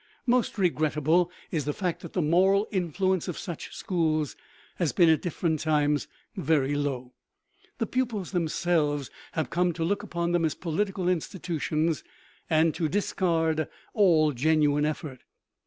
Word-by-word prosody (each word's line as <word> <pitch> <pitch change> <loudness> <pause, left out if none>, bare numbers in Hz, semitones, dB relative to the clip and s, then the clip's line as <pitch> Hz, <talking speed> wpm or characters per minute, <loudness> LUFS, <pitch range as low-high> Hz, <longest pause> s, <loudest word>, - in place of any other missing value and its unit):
Most 245 -2 +1
regrettable 160 -1 +2 0.2
is 155 -5 -1
the 150 - -1
fact 180 -4 -2
that 170 - -9
the 180 - +1
moral 190 +6 +3
influence 185 0 0
of 180 - -4
such 170 -3 -6
schools 155 -5 0 0.4
has 170 -5 0
been 170 -2 +5
at 160 - +4
different 165 -2 -1
times 150 -2 +1 0.3
very 155 -7 +1
low. 135 -3 -2 0.6
The 225 - 0
pupils 225 -7 -2
themselves 160 -5 0 0.2
have 155 -6 -2
come 180 0 +2
to 165 - -3
look 200 +4 0
upon 170 -4 -2
them 175 -1 +2
as 155 -3 0
political 185 +2 -2
institutions 165 -2 -1 0.5
and 160 0 +3
to 160 -3 -1
discard 165 -4 0 0.3
all 165 -7 +4
genuine 150 +2 +2
effort. 150 -4 -5
165 Hz, 140 wpm, -27 LUFS, 155-180 Hz, 0.6 s, been